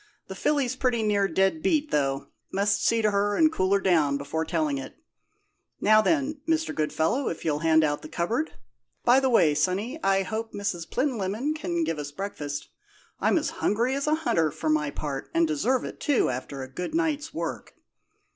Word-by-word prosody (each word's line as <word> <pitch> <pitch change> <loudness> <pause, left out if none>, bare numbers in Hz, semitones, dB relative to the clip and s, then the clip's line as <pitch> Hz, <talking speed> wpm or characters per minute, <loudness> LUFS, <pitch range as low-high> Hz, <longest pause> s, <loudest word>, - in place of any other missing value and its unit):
"The - - -4
filly's 275 -4 0
pretty 250 -3 0
near 205 -2 +2
dead 190 -5 +1
beat, 300 - +1
though 140 -1 0 0.2
must 200 +1 +1
see 230 -1 +2
to 210 - +3
her 205 +1 +1
and 315 -1 +4
cool 185 -6 0
her 200 - +4
down 155 -7 +2
before 150 +3 -3
telling 155 -5 0
it. 135 - -8 0.8
Now, 215 +1 +5
then, 290 +2 0
Mr. 320 0 +1
Goodfellow, 160 - 0
if 165 - -6
you'll 150 -2 +1
hand 160 0 +4
out 145 -1 0
the 155 - -10
cupboard. 230 - -1 0.5
By 245 +2 +6
the 265 -1 +1
way, 170 -11 +4
sonny, 190 - -1
I 195 0 +3
hope 220 +3 -4
Miss 180 -5 -3
Plinlimmon 250 +1 -1
can 175 - -2
give 160 -1 -2
us 145 0 -5
breakfast. 145 -5 -5 0.5
I'm - - +3
as - - -1
hungry 235 +5 +1
as 280 +2 -2
a 305 - +3
hunter, 165 - +1
for 155 +2 -3
my 150 -1 +2
part, 140 -1 -5
and 335 0 +4
deserve 265 -5 0
it, - - -8
too, 285 - +2
after 130 +2 -5
a - - -7
good 180 - -5
night's 320 -2 0
work. - - -5
200 Hz, 190 wpm, -26 LUFS, 155-260 Hz, 0.8 s, By